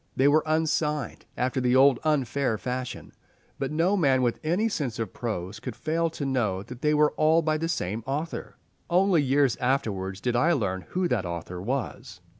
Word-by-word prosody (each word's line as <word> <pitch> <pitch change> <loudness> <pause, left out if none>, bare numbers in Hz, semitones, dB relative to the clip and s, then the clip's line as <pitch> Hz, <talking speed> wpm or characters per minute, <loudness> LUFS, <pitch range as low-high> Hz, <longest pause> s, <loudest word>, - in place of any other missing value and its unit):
They 135 - +4
were 150 +2 +5
unsigned, 155 -2 -1
after 130 +1 0
the 125 0 +2
old 135 -1 +6
unfair 140 -5 +1
fashion, 125 +3 -5 0.5
but 135 - -2
no 170 +6 +2
man 135 -8 +3
with 120 -2 0
any 175 +8 +1
sense 145 - -3
of 115 - -4
prose 110 -8 -4
could 125 -4 -6
fail 165 +5 0
to 150 -2 -5
know 110 -8 0
that 125 +3 -10
they 150 0 +2
were 150 0 +4
all 160 +2 +4
by 155 0 +1
the 165 +1 -2
same 110 - -2
author. 150 +5 -4 0.3
Only 180 -1 +4
years 140 -2 +2
afterwards 100 -7 -1
did 120 +3 -1
I 160 +8 +3
learn 95 - -2
who 180 0 0
that 100 -7 0
author 85 +1 -5
was. 110 -5 -4
135 Hz, 185 wpm, -26 LUFS, 115-155 Hz, 0.5 s, old